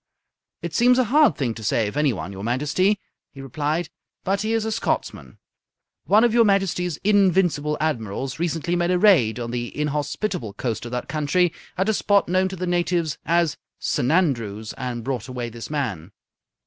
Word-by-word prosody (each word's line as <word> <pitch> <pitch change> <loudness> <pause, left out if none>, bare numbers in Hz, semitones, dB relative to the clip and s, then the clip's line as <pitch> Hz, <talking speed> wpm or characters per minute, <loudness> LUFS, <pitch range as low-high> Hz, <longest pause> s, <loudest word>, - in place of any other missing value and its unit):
"It 170 -2 -4
seems 245 +6 +4
a 255 - +4
hard 285 +3 +4
thing 125 -5 -1
to 110 - -9
say 105 +2 +1
of 105 - -6
anyone, 115 - 0
your 100 0 -8
Majesty," 150 - +1 0.3
he 140 - -14
replied, 150 +5 -2 0.4
"but 195 +1 0
he 215 +1 -1
is 225 -1 0
a 220 - -2
Scotsman. - - -3 0.7
One 215 +3 +5
of 240 -2 +3
your 235 -1 +6
Majesty's 190 -5 +1
invincible 180 -7 +2
admirals 130 -2 -2
recently 170 +1 -1
made 175 0 +1
a 180 - +3
raid 160 - +4
on 115 -1 -4
the 120 -1 -3
inhospitable 150 - -2
coast 115 +1 -3
of - - -9
that 125 0 -3
country 155 +4 +1 0.2
at 190 +2 +1
a 220 - +3
spot 205 -1 +2
known 185 +2 +2
to 190 - -6
the 180 0 -3
natives 175 -3 0
as 170 -1 +2 0.2
S'nandrews 120 - 0
and 120 -2 -4
brought 125 -4 -3
away 125 -2 -4
this 115 0 -8
man." 110 - -3
155 Hz, 175 wpm, -23 LUFS, 120-185 Hz, 0.7 s, your